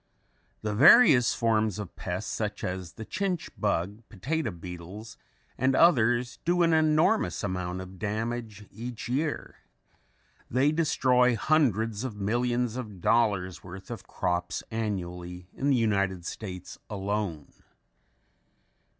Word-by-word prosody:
The 105 -1 -1
various 130 - +7
forms 110 -3 +1
of 105 -4 -7
pests 90 +4 -4
such 105 -1 -3
as 90 -2 -4
the 110 - -8
chinch 190 - -2
bug, 100 +6 -1
potato 135 - -2
beetles, 90 +4 -9 0.4
and 130 +1 +2
others 120 -7 +3
do 175 +1 +2
an 165 -1 +3
enormous 155 - +2
amount 90 -1 -3
of 95 0 -11
damage 110 0 -3
each 120 +2 -7
year. 145 +5 -2 0.9
They 135 +5 +3
destroy 130 -6 +3
hundreds 115 -5 +1
of 130 -5 -4
millions 120 +3 0
of 105 -7 -7
dollars 100 -4 +1
worth 95 +4 -10
of 115 -5 -7
crops 90 -1 -2
annually 90 -5 -4
in 140 - -1
the 135 - +4
United 100 -5 0
States 90 -2 -7
alone. 100 -6 -3
110 Hz, 120 wpm, -28 LUFS, 95-125 Hz, 0.9 s, various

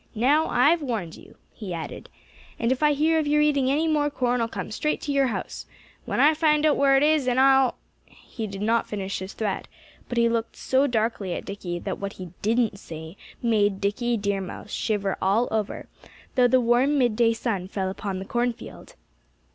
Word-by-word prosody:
Now 285 +8 +3
I've 305 +7 +3
warned 220 - -3
you," - - -16 0.2
he 190 -6 -6
added. 160 - -7 0.5
"And 230 +1 0
if 260 - -1
I 300 -1 +4
hear 320 +3 +2
of 305 - -1
your 300 +1 +3
eating 285 -3 +2
any 305 +4 +1
more 300 -2 +2
corn 250 -3 0
I'll 230 - +1
come 200 -4 -6
straight 300 +8 -1
to 290 - -3
your 275 -1 +3
house 235 - -5 0.4
when - - -2
I 300 +2 +6
find 305 -1 +2
out 300 - +4
where 275 -1 +4
it 270 - +3
is 300 -3 +3
and 250 0 +2
I'll 265 -1 +5 0.3
" - - -40 0.3
He 225 -3 -3
did 195 0 -6
not 230 +2 +1
finish 200 -2 -4
his 190 +2 -7
threat. 210 -3 -3 0.4
But 245 - -4
he 235 0 +4
looked 230 0 -2
so 265 +2 +1
darkly 220 -6 -1
at - - -6
Dickie 185 -3 -5
that 185 +2 -5
what 200 0 -4
he 180 -3 -9
didn't 225 -1 +1
say 160 0 -9 0.3
made 205 -4 +2
Dickie 230 +4 0
Deer 200 -1 -1
Mouse 190 +2 -8
shiver 200 -3 -1
all 205 +6 +2
over, 215 -2 -3 0.5
though 250 -1 +4
the 255 +1 +4
warm 250 +4 +3
midday 235 -2 +3
sun 220 -5 -3
fell 190 -1 -3
upon 195 0 -4
the 190 - -6
cornfield. 240 +1 -4
235 Hz, 205 wpm, -25 LUFS, 200-275 Hz, 0.5 s, I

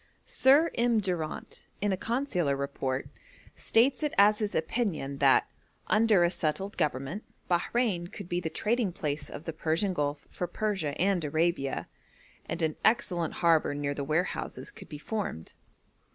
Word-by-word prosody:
Sir 285 +5 +4
M. 235 -1 +2
Durant, 175 -6 -3
in 205 0 0
a - - +2
consular 195 - 0
report, 135 -1 -2 0.5
states 250 +7 +2
it 300 -1 -1
as 210 +1 +6
his 210 -2 -2
opinion 160 - -1
that, 135 -2 +5 0.4
'under 215 -4 +4
a 170 - +3
settled 190 +4 -2
government, 145 +7 -2 0.2
Bahrein 180 0 +1
could - - -8
be 175 0 -1
the 165 -2 -3
trading 220 +2 0
place 150 -6 -3
of 150 - -8
the 165 - -4
Persian 165 +5 0
Gulf 145 -2 -2
for 180 - -3
Persia 190 -10 -2
and 185 -2 +2
Arabia, 155 -2 0 0.6
and 170 - -2
an 155 -1 0
excellent 175 -7 +1
harbour 160 -3 +4
near 145 0 -1
the 140 - -4
warehouses 160 - -2
could - - -13
be 150 - -7
formed.' 175 - -4
175 Hz, 150 wpm, -29 LUFS, 150-210 Hz, 0.6 s, as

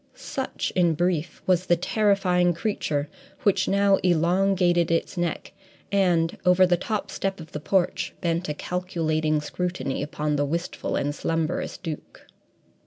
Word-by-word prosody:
Such, - - -4
in 175 -3 +3
brief, 175 -1 -1
was 185 0 +2
the 175 - +5
terrifying 180 -2 +2
creature 155 -6 -1 0.4
which 195 -2 +3
now 200 0 +4
elongated 175 0 +2
its 165 +3 0
neck, 175 -2 -3 0.4
and, 175 -4 +2
over 180 +1 +5
the 180 -1 +3
top 210 +4 -3
step 195 -1 -2
of 160 -1 -10
the 150 - -4
porch, 180 +3 0
bent 170 0 -1
a 150 - -2
calculating 160 -3 -1
scrutiny 150 -4 -3
upon 150 0 -2
the 145 - +1
wistful 170 +4 -3
and 145 +1 0
slumberous 165 +2 -2
Duke. 160 -5 -8
175 Hz, 140 wpm, -25 LUFS, 160-185 Hz, 0.4 s, the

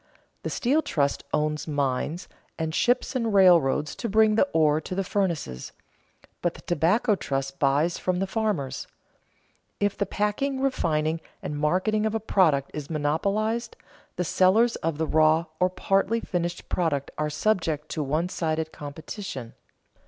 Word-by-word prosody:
The - - -3
steel 275 +6 +1
trust 140 - 0
owns 150 0 -1
mines, 145 +3 -1 0.3
and 160 -1 -2
ships 245 +8 +1
and 230 -3 0
railroads 170 -7 +4
to 235 - -3
bring 215 +1 +4
the 225 +6 +3
ore 155 -1 +3
to 185 - -6
the 195 - 0
furnaces; 170 - -2 0.7
but 175 -1 0
the - - -12
tobacco 185 - +2
trust 135 -7 -3
buys 145 +5 +2
from 185 -1 0
the 195 - 0
farmers. 190 - -2 0.9
If 205 -1 +1
the 200 - -1
packing, 210 +8 -1
refining, 165 - 0 0.2
and 150 - -4
marketing 185 +8 +1
of 220 - -2
a - - +1
product 160 -10 +2
is 150 -2 -6
monopolized, 200 +10 -1 0.4
the 180 - -1
sellers 215 +8 +3
of 160 -2 -2
the 160 - 0
raw 155 +1 +3
or 180 - +3
partly 195 +4 +1
finished 175 -4 -3
product 155 -6 -1
are 150 0 0
subject 155 -3 0
to 155 - -2
one 155 +5 0
sided 160 -3 -2
competition. 145 - -7
170 Hz, 150 wpm, -26 LUFS, 150-205 Hz, 0.9 s, railroads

